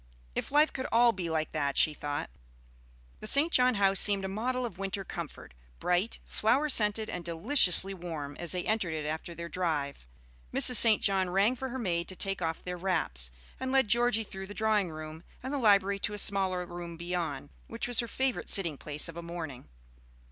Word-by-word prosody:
"If - - -4
life 300 +2 +3
could 260 -1 -4
all 235 +1 +5
be 180 -5 -5
like 155 -1 -2
that!" 140 -3 -2
she 155 - +4
thought. 145 - -5 0.9
The 215 - -6
St. 290 +8 +5
John 250 -1 +4
house 195 -1 +3
seemed 200 -2 +2
a - - -2
model 245 +6 -2
of 195 -6 -8
winter 195 0 -3
comfort, 170 - -8 0.3
bright, 180 +5 -1
flower 265 +8 0
scented, 215 -3 +2
and 180 - -6
deliciously 185 - +5
warm, 160 -6 -7
as 175 -2 -2
they 180 -1 -2
entered 200 -7 -1
it 155 -1 -4
after 160 +3 -5
their 170 0 -7
drive. 150 - -3 0.4
Mrs. 250 - +6
St. 220 -2 +6
John 190 -2 +1
rang 200 +7 +2
for 265 +1 -5
her 260 - -5
maid 170 -8 -2
to 185 - -6
take 195 0 -3
off 165 -1 -3
their 180 0 -5
wraps, 160 - -1 0.3
and 260 0 -3
led 265 -5 +2
Georgie 240 -1 +2
through 190 -2 -8
the 205 - -10
drawing 215 -4 +1
room 155 0 -9 0.2
and 260 +2 -5
the 285 - -1
library 200 -3 +3
to 210 - 0
a - - -7
smaller 190 -3 0
room 175 -1 -8
beyond, 170 -4 -4 0.2
which 230 +1 -4
was 245 -2 +5
her 235 - 0
favorite 260 +1 -2
sitting 170 -8 +2
place 150 0 0
of 165 0 -9
a - - -5
morning. 165 -6 -8
190 Hz, 200 wpm, -29 LUFS, 170-225 Hz, 0.9 s, Mrs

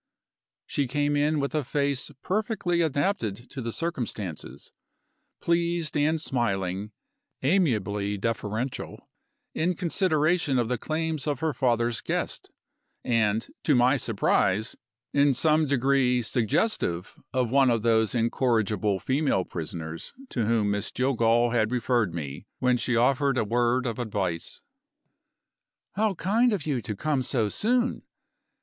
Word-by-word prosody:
She 140 -2 -1
came 145 +3 0
in 150 +1 +2
with 140 0 -2
a 155 -2 0
face 140 +1 -1
perfectly 190 -4 0
adapted 140 - -1
to 135 - -5
the 115 -1 -3
circumstances 110 - -5 0.7
pleased 170 -1 0
and 155 +2 +2
smiling; 100 - -1 0.5
amiably 105 - +1
deferential, 115 +3 -3 0.5
in 175 +3 0
consideration 160 -4 +1
of 120 -2 +1
the 125 -2 -1
claims 155 -1 -2
of 145 -3 -1
her 160 -2 0
father's 120 -4 +1
guest - - -3 0.5
and, 110 -2 +1
to 150 - +3
my 125 +3 +4
surprise, 110 -3 +1 0.4
in 140 -1 +4
some 155 +3 +3
degree 130 -2 +2
suggestive 110 - 0 0.2
of 125 -3 0
one 135 -1 +5
of 115 -3 +1
those 110 -1 +2
incorrigible 110 -4 +1
female 135 - +1
prisoners, 80 -1 -6 0.2
to 115 -5 -1
whom 110 -3 +2
Miss 100 0 -2
Jillgall 120 -2 +2
had 115 -2 +1
referred 120 -6 +1
me 75 +3 -6
when 125 -1 +2
she 120 0 0
offered 135 +3 +2
a - - +2
word 120 +3 +1
of 115 -1 -3
advice. 95 -8 -3 1.3
"How 210 -1 +1
kind 220 +8 +2
of 185 -8 -2
you 140 -6 -1
to 105 - -5
come 145 +4 0
so 115 -4 0
soon! 240 - +1
125 Hz, 130 wpm, -26 LUFS, 110-150 Hz, 1.3 s, one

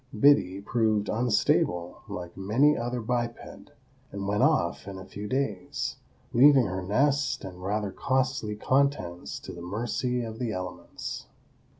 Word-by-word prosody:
Biddy 100 -9 +5
proved 110 -1 +1
unstable, 105 -6 +1
like 90 -1 -6
many 115 +10 +3
another 120 -2 -2
biped, 120 +1 -1 0.7
and 100 -1 -4
went 105 +1 +1
off - - +2
in 100 -1 -6
a 95 - -8
few 105 +2 -7
days, 105 -7 -2 0.4
leaving 135 +1 +7
her 95 -1 -3
nest 135 +7 +1
and 90 -1 -9
rather 100 +1 -1
costly 130 -3 0
contents 105 - 0
to - - -8
the 85 - -9
mercy 120 +6 -2
of 110 0 -6
the 120 -3 -1
elements. 90 0 -6
110 Hz, 135 wpm, -28 LUFS, 95-125 Hz, 0.7 s, leaving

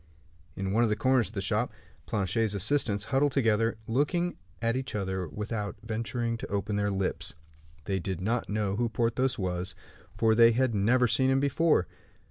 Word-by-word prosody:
In 95 0 -3
one 115 - +3
of 120 - +3
the 105 - +1
corners 130 +1 +2
of 110 - -12
the 95 - -1
shop, 95 - 0 0.4
Planchet's 105 +1 0
assistants, 105 0 +1
huddled 135 +4 +1
together, 115 -3 +2
looked 140 +10 +1 0.4
at 115 +1 0
each 130 -3 -3
other 95 -3 -2
without 105 +3 -4
venturing 115 +1 -2
to - - -6
open 100 +1 -2
their 105 0 +1
lips. 95 -5 -2 0.5
They 95 -1 -1
did 95 -1 -4
not 110 +5 -1
know 105 -1 -1
who 120 0 +1
Porthos 120 +3 0
was, 90 -2 -2 0.4
for 110 -1 +4
they 115 +1 +6
had 130 0 +1
never 115 +5 +3
seen 130 +3 +2
him 135 0 +3
before. 140 - +2
110 Hz, 175 wpm, -29 LUFS, 100-120 Hz, 0.5 s, they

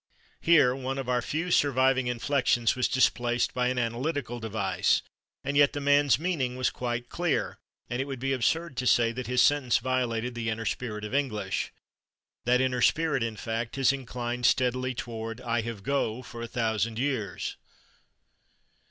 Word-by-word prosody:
Here 150 -7 +5
one 135 0 -4
of 135 -2 -4
our 125 -1 +1
few 165 +8 -3
surviving 130 -3 +3
inflections 120 -1 +1
was 130 -1 +1
displaced 120 -2 +1
by 125 -1 +1
an 125 0 -1
analytical 120 +1 -2
devise, 110 -4 0 0.4
and 140 +1 -2
yet 145 -1 +5
the 145 - -3
man's 145 -1 +4
meaning 150 -7 -1
was 130 0 0
quite 120 -1 -3
clear, 175 -1 -1 0.3
and 120 +2 -2
it - - -2
would 135 -1 -5
be 135 +2 -1
absurd 155 +3 0
to 130 - -1
say 115 -1 +4
that 125 +1 -5
his 125 0 +3
sentence 145 -5 +3
violated 125 -1 -1
the 115 -1 -3
inner 110 +1 -3
spirit 105 -4 -3
of 105 - -7
English. 105 -9 -1 0.7
That 125 +1 +3
inner 125 -1 0
spirit, 155 +2 +2
in 115 -1 -2
fact, 115 +2 -4
has 135 0 +3
inclined 125 -2 -2
steadily 130 0 +1
toward 115 0 -5
"I 120 -2 -1
have 115 -3 -6
/go/" 125 -2 -1
for 115 0 -8
a 115 - -4
thousand 115 -1 -1
years. 115 -9 -2
125 Hz, 170 wpm, -28 LUFS, 115-135 Hz, 0.7 s, Here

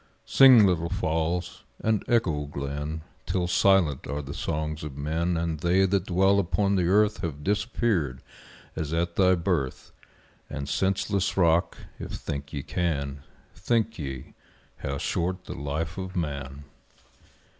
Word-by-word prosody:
Sing 130 -6 +8
little 85 -3 +1
Falls; 80 +3 -1 0.2
and 110 -2 +1
echo 80 -11 +1
Glen, 75 +2 -4 0.2
Till 90 -1 0
silent 90 -4 +3
are 70 +2 -3
the 70 +1 -7
songs 75 0 -3
of 70 -3 -7
men 80 +4 -1
And 80 -2 -2
they 90 +4 +3
that 95 0 0
dwell 95 +2 +3
upon 100 +2 +1
the 90 -3 +2
earth 105 +3 +3
Have 75 -5 -4
disappeared 100 - 0 0.5
as 80 0 -3
at 85 +1 -1
thy 95 -1 +5
birth 85 -7 -2 0.6
And 70 -1 -5
senseless 95 +6 0
Rock 85 -2 +3 0.2
if - - -6
think 70 -1 -5
ye 70 -3 -4
can, 70 -6 -2 0.3
Think 115 -3 0
ye 65 -4 -6 0.4
how 70 0 -3
short 90 +5 -2
the - - -6
life 80 +6 -4
of 95 0 -6
man! 70 -4 -4
85 Hz, 140 wpm, -26 LUFS, 75-95 Hz, 0.6 s, Sing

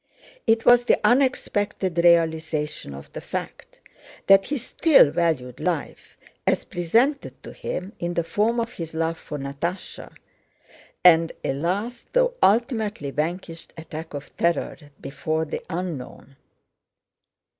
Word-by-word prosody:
It 225 0 +3
was 245 0 +6
the - - +3
unexpected 205 -8 +1
realization 160 - +1
of 70 - -12
the - - -7
fact - - -7 0.5
that 195 0 +6
he 290 - -1
still 260 - +4
valued 155 -7 -1
life 170 -5 -4 0.3
as - - +2
presented 230 - 0
to - - -9
him 190 +4 -5
in 175 0 -3
the 170 - +1
form 220 +7 0
of 235 0 -3
his 165 -5 -7
love 165 0 -1
for 150 - -7
Natásha, 140 +7 -5 0.9
and 165 -2 +6
a - - 0
last, 200 - -3
though - - +3
ultimately 215 - +1
vanquished, 165 +2 -4
attack 160 -1 -8
of 140 - -9
terror 170 0 0 0.2
before 155 +3 -2
the - - -5
unknown. 165 -6 -6
170 Hz, 125 wpm, -24 LUFS, 160-220 Hz, 0.9 s, was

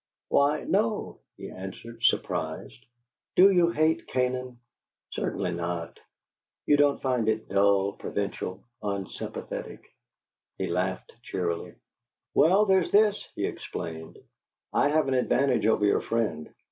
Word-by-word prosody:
"Why, 145 +2 +3
no!" 215 +2 0 0.2
he - - -8
answered, 115 +5 -9
surprised. - - -1 0.5
"Do 195 +2 +8
you 175 -2 +4
hate 160 0 +1
Canaan?" 125 -1 -1 0.5
"Certainly 90 - -2
not." 85 -1 -4 0.7
"You 145 - +5
don't 145 -1 +3
find 125 -4 +1
it 110 0 -1
dull, 100 0 +3
provincial, 100 -1 -4 0.2
unsympathetic?" 100 -2 -6 0.6
He - - -2
laughed 90 +2 -2
cheerily. 85 -6 -3 0.6
"Well, 190 +6 +5
there's 190 -3 +3
this," 210 0 +4
he - - -1
explained: 80 0 -6 0.6
"I 145 - +3
have 155 0 +2
an 135 - +1
advantage 130 -2 +2
over 110 -2 +3
your 100 - +3
friend. 110 -9 -2
120 Hz, 120 wpm, -27 LUFS, 95-155 Hz, 0.7 s, Do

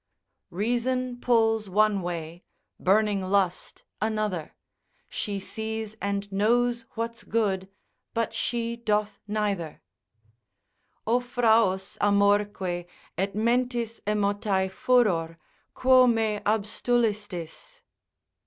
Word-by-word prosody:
——— - - -53
Reason 245 +5 -1
pulls 225 -4 +2
one 210 +1 +3
way, 170 -1 -5 0.4
burning 205 +1 +2
lust 185 -1 -1 0.2
another, 215 -7 -2 0.5
She 200 -1 -3
sees 220 +1 -4
and 200 0 -2
knows 235 +4 +2
what's 230 0 -3
good, 195 -4 -1 0.5
but 230 -1 0
she 235 0 -1
doth 210 -2 -1
neither, 200 - -2 1.2
O 235 +3 +3
fraus, 225 -6 +2
amorque, 200 -3 +2 0.3
et 195 +3 -2
mentis 235 0 0
emotae 205 -2 0
furor, 190 -9 +2 0.4
quo 255 0 +6
me 220 -3 +1
abstulistis? 215 - -1
210 Hz, 90 wpm, -26 LUFS, 195-230 Hz, 1.2 s, quo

